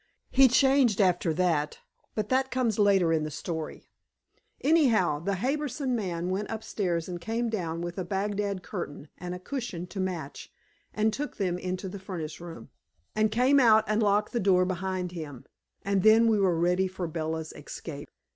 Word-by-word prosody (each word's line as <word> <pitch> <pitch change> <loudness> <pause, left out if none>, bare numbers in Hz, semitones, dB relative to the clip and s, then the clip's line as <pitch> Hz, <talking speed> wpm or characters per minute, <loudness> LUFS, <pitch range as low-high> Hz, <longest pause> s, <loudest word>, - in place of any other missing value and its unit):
He 265 0 +7
changed 260 -3 +4
after 180 -4 +3
that, 160 -4 +1 0.4
but 215 -1 -2
that 260 +1 +2
comes 240 -5 0
later 195 -5 +4
in 155 -1 +1
the 155 - -3
story. 160 +1 -5 0.7
Anyhow, 245 - +3
the 195 +5 -1
Harbison 265 - -1
man 180 -5 -2
went 200 +2 -2
upstairs 190 -6 -2
and 175 -2 -6
came 230 +3 -1
down 170 -6 -2
with 175 +2 -4
a - - -1
Bagdad 200 +1 -2
curtain 160 -6 -6
and 180 +1 -5
a - - -7
cushion 210 -5 -5
to 180 +2 -8
match, 175 -7 -4 0.4
and 215 0 +1
took 295 +4 -4
them 180 -3 -1
into 185 +1 -3
the 195 +2 -7
furnace 170 -5 -6
room, 170 -1 -9 0.4
and 215 0 +3
came 255 +5 +4
out 220 -4 +6
and 215 +1 +1
locked 205 0 +2
the 240 - +1
door 185 -2 +4
behind 185 0 -2
him, 155 -7 -8 0.4
and 200 -1 +1
then 220 +3 +6
we 220 -2 +3
were 185 -4 +2
ready 180 +3 +2
for 185 -1 -5
Bella's 160 -1 -3
escape. - - -8
190 Hz, 175 wpm, -28 LUFS, 175-220 Hz, 0.7 s, He